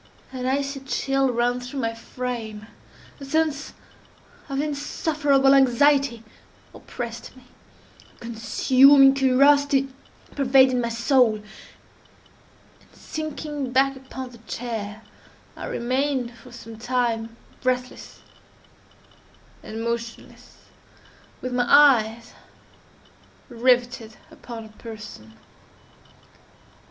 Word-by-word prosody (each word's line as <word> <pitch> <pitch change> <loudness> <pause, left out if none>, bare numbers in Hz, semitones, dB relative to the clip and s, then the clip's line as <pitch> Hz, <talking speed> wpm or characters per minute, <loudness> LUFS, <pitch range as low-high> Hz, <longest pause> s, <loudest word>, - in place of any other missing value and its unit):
An 255 -1 -4
icy 275 +1 -1
chill 270 0 0
ran 245 +1 0
through 250 +3 -7
my 230 -1 -1
frame; 230 -2 -6 0.5
a - - -10
sense 305 0 -1 0.8
of 275 0 -2
insufferable 290 -1 +1
anxiety 270 -2 +3 0.5
oppressed 235 -1 -8
me; 255 - -16 0.7
a - - -28
consuming 260 +4 +5
curiosity 275 +1 +3 0.5
pervaded 260 -2 +4
my 235 - -2
soul; 235 0 +3
and 210 - -9 1.5
sinking 300 -3 -5
back 270 +1 +2
upon 260 -1 -9
the 235 - -15
chair, 220 -3 -5 0.5
I - - -7
remained 255 0 -1
for 250 +2 -16
some 230 -2 -11
time 230 -2 -2 0.2
breathless 255 0 -3 1.4
and 225 +1 -7
motionless, 235 0 -6 0.8
with 255 0 -4
my 245 0 +1
eyes 235 -6 +4 1.2
riveted 240 -2 0
upon 230 -2 -9
her 220 -1 -14
person. 210 - -10
250 Hz, 90 wpm, -23 LUFS, 235-275 Hz, 1.5 s, consuming